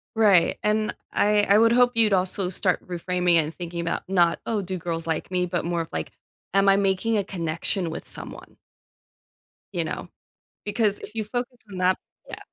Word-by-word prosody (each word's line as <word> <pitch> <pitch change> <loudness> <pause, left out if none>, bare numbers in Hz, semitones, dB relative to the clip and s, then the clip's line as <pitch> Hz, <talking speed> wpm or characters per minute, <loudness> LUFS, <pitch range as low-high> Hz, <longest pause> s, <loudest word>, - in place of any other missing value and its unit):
Right, 200 -6 +4
and 215 0 0 0.2
I 210 0 +3
I 205 0 +4
would 230 +1 +5
hope 245 +1 +4
you'd 225 -2 +4
also 185 0 +1
start 185 0 0
reframing 180 0 0
and 160 -1 +2
thinking 175 -1 -6
about 165 -1 -2
not, 175 -3 +3
"Oh, 220 -3 -1
do 185 0 -4
girls 165 -1 -3
like 160 +2 -2
me?" 180 -1 +1
but 175 0 -2
more 170 0 -1
of, 165 - -7
like, 80 0 -4 0.4
"Am 195 0 +3
I 195 - +6
making 200 +3 +1
a 200 - +1
connection 170 0 -2
with 160 - -7
someone?" - - -7 1.2
You - - -1
know? - - -5 0.6
Because 205 -1 +3
if - - -10
you 220 - -1
focus 245 +3 -4
on 190 - -7
that 185 0 +3 0.3
yeah. - - -7
185 Hz, 185 wpm, -24 LUFS, 175-210 Hz, 1.2 s, I